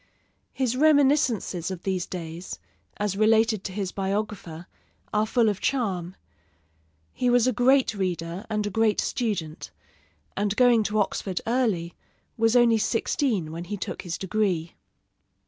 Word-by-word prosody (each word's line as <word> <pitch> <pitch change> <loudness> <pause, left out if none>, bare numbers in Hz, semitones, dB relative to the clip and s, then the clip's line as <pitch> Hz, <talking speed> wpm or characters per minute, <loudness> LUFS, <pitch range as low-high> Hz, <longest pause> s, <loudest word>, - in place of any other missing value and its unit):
His 255 -2 -1
reminiscences 275 - +2
of 185 -2 -6
these 185 -2 -2
days, 170 0 -6 0.4
as 205 -2 -1
related 220 -1 +3
to 195 - -3
his 190 -1 -3
biographer, 195 -4 -3 0.5
are 215 +1 +2
full 235 0 +2
of 205 -2 0
charm. 190 -9 -1 1.0
He 250 - 0
was 245 -1 +4
a 255 - +2
great 255 +1 +3
reader 180 0 -3
and 210 -1 -1
a 205 - -3
great 220 +1 +2
student; 190 -10 -2 0.7
and 205 0 0
going 245 -1 +5
to 210 +1 -1
Oxford 195 -2 -1
early, 220 -9 0 0.4
was 225 +1 +2
only 235 -2 +5
sixteen 215 - 0
when 170 +2 -6
he 205 +3 -4
took - - -5
his 175 -2 -4
degree. 190 -4 -1
210 Hz, 140 wpm, -25 LUFS, 185-235 Hz, 1.0 s, going